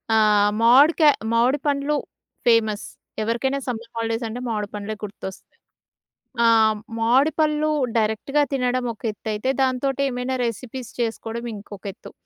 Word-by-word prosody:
ఆహ్, 210 -1 +4
మామిడికా 295 +6 +6 0.2
మామిడి 250 +5 +3
పండ్లు 285 +1 +1 0.5
ఫేమస్. 220 -3 +3 0.4
ఎవరికైనా 250 +5 0
సమ్మర్ 230 -1 -5
హాలిడేస్ 230 +1 -2
అంటే 240 +3 -5
మామిడి 210 -3 -2
పండ్లే 210 +1 -4
గుర్తొస్తాయి. 195 -2 -6 1.1
ఆ! 235 - +4 0.5
మామిడి 255 +7 +3
పళ్ళు 305 0 +2 0.3
డైరెక్ట్‌గా 220 +7 +1
తినడం 250 -1 0
ఒక - - -23
ఎత్తైతే 215 +4 -3
దాంతోటి 265 +1 0
ఏమైనా 250 +1 -2
రెసిపీస్ 240 +2 -5
చేసుకోవడం 230 0 -3
ఇంకొక 205 -1 -11
ఎత్తు. - - -13
235 Hz, 120 wpm, -23 LUFS, 220-265 Hz, 1.1 s, మామిడికా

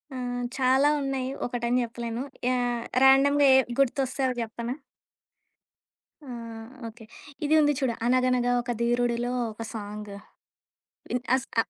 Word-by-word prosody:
ఆహ్, 245 -1 -3
చాలా 265 +2 +4
ఉన్నాయి. 265 -1 -2 0.2
ఒకటని 245 0 0
జెప్పలేను. 235 +1 -4 0.3
యాహ్! 245 -2 0 0.2
ర్యాండమ్‌గా 280 +1 +6
ఏ - - +8 0.2
గుర్తొస్తే 270 0 +1 0.2
జెప్పనా? 235 +2 -4 1.6
ఆహ్, 230 -1 -8 0.2
ఓకే. 225 0 -12 0.4
ఇది 305 - +2
ఉంది 295 -1 +4
చూడు. 255 -4 0
'అనగనగ 250 0 +2
ఒక 240 0 -4
ధీరుడిలో' 240 0 +1 0.2
ఒక 220 - -10
సాంగు. 210 -1 -7 1.0
ఇన్ 250 0 -1
అస్ 260 - -2 0.2
అహ్ - - -9
245 Hz, 120 wpm, -26 LUFS, 235-260 Hz, 1.6 s, ఏ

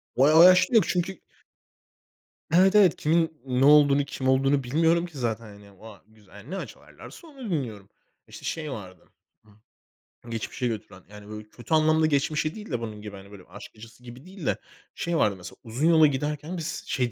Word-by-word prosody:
O 130 - +3
o 155 +4 +7
yaşta 185 +7 +6
yok 225 - +6
çünkü 185 0 -2 1.3
Evet, 190 +3 +5
evet. 195 -5 +5
Kimin 160 0 0
ne 130 +1 +1
olduğunu, 145 -1 +5
kim 135 -2 -5
olduğunu 135 +1 +2
bilmiyorum 165 +6 +1
ki 170 -5 -12
zaten, 115 -2 -3
hani. 100 -2 -16
Vay 110 -2 -13
güzel, 110 -2 -23
hani, 105 +6 -13
ne 195 - -3
açarlarsa 335 - -11
onu 270 -7 -9
dinliyorum. 115 - -4 0.4
İşte, - - -12
şey 155 -3 -4
vardı; 95 -7 -10 1.2
ıh, - - -11
geçmişe 115 +2 -3
götüren. 105 -4 -7
Yani, 105 0 -13
böyle, 105 0 -9
kötü 120 +8 -7
anlamda 155 0 +3
geçmişe 155 +1 0
değil 220 0 -10
de 120 - -1
bunun 110 -2 -7
gibi, 105 -1 -9
hani, 100 +1 -13
böyle, 100 -3 -13
aşk - - -11
acısı 115 +2 -15
gibi 125 +4 -12
değil 185 -5 -10
de. - - 0 0.4
Şey 170 -1 -2
vardı 105 -6 +2
mesela, 90 0 -11
uzun 125 +7 -1
yola 160 -2 +6
giderken 150 +5 -3
biz 160 -2 -5
şey 125 -6 -1
140 Hz, 185 wpm, -25 LUFS, 110-160 Hz, 1.3 s, o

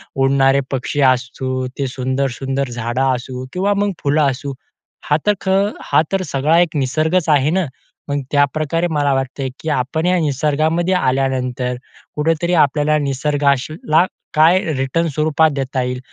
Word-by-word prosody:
उडणारे 135 0 +3
पक्षी 135 +2 -2
असू, 130 +1 -3
ते 135 - 0
सुंदर, 130 +2 -1
सुंदर 135 0 -2
झाडं 120 +1 -3
असू 125 +1 -6
किंवा 195 +3 +1
मग 200 0 0
फुलं 145 +2 +2
असू 140 +2 -6 0.6
हा 150 - +4
तर 210 - +4
खं 195 +1 +2 0.2
हा - - +3
तर 195 - +1
सगळा 150 +5 +2
एक 175 -2 +1
निसर्गच 155 +5 0
आहे 145 0 +3
ना. 185 +1 +1 0.4
मग 145 0 0
त्याप्रकारे 155 +4 +1
मला 145 -2 +1
वाटते 135 0 -2
की 160 - -4
आपण 150 +4 -1
या 180 0 +3
निसर्गामध्ये 155 +4 0
आल्यानंतर, 130 -4 0 0.4
कुठेतरी 165 +3 0
आपल्याला 150 +1 +2
निसर्गासला 145 +3 +1 0.3
काय 165 +4 +5 0.2
रिटर्न 135 +6 0
स्वरूपात 155 +1 +2
देता 135 -1 -2
येईल, 125 0 -3
145 Hz, 145 wpm, -18 LUFS, 135-160 Hz, 0.6 s, काय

